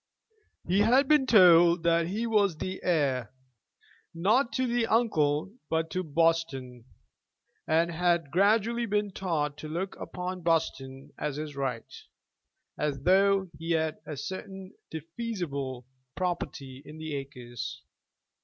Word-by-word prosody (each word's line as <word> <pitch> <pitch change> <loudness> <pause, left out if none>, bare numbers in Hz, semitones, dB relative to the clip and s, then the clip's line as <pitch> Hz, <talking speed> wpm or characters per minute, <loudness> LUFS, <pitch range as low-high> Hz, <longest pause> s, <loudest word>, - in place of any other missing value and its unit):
He 185 +3 +2
had 250 +6 +4
been 295 -3 +4
told 175 -5 +6
that 170 0 +2
he 210 +6 -2
was 205 -7 +2
the 185 +3 -5
heir, 140 - 0 0.8
not 220 +10 +2
to 260 - +1
the 240 -1 0
uncle, 185 -6 +1 0.2
but 160 0 -1
to 185 - -1
Buston, 150 -6 0 0.8
and 165 +2 +2
had 170 -3 +1
gradually 220 +6 +2
been 210 -1 0
taught 155 -7 -2
to 155 - -7
look 175 +5 -4
upon 180 0 -5
Buston 140 -5 -2
as 150 -2 -2
his 150 -1 -6
right, 130 -4 -3 0.9
as 140 -3 -2
though 195 0 +3
he 165 +1 -1
had 160 -1 -1
a 150 - -5
certain 190 +3 -7 0.2
defeasible 160 - -5 0.3
property 140 -7 -4
in 150 +2 -11
the 155 -1 -6
acres. 125 -2 -7
165 Hz, 125 wpm, -28 LUFS, 145-195 Hz, 0.9 s, told